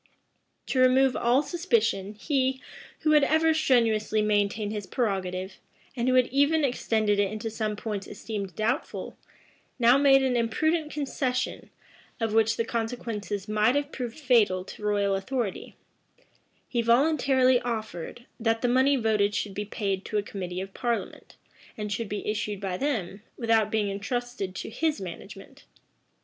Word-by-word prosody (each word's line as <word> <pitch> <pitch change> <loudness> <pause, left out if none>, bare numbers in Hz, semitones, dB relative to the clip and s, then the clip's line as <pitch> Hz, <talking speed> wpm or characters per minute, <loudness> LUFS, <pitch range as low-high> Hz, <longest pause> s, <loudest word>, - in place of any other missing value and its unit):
To 260 - -1
remove 255 0 +4
all 245 +4 +3
suspicion, 335 - 0
he, 265 +2 0 0.4
who 310 - +2
had 300 -2 +6
ever 320 +2 +3
strenuously 225 -8 +2
maintained 205 0 0
his 205 -3 -5
prerogative, 190 -4 -2 0.4
and 240 -1 -1
who 255 - +3
had 255 -1 +5
even 285 +4 +3
extended 220 -5 +1
it 200 -1 +1
into 220 +1 -4
some 215 -1 -2
points 205 -2 -5
esteemed 200 -3 -6
doubtful, 235 +6 -2 0.6
now 245 +2 +5
made 270 -1 +5
an 260 -2 +1
imprudent 305 +7 0
concession, 260 -3 -2 0.5
of 225 -2 -1
which 225 0 +3
the 230 - 0
consequences 225 -4 -3
might 215 +4 +2
have 285 +1 -1
proved 245 -1 -5
fatal 230 -10 +3
to - - -11
royal 205 -1 +1
authority; 200 +2 -3 0.9
he 240 - 0
voluntarily 260 +1 +3
offered, 220 -2 -5
that 225 0 0
the - - +3
money 260 +3 +4
voted 215 -4 +1
should 205 - -2
be 205 +2 -4
paid 195 -2 -2
to 215 - -2
a 205 - +1
committee 185 -3 -5
of 195 0 -8
parliament, 235 -1 -3 0.4
and 210 -1 -4
should 220 0 -3
be 210 - -4
issued 210 -1 -2
by 190 -2 -3
them, 210 -7 -2 0.2
without 225 -3 +2
being 215 -1 0
intrusted 200 -1 -4
to - - -6
his 310 +2 0
management. 195 +8 -10
225 Hz, 150 wpm, -27 LUFS, 205-260 Hz, 0.9 s, had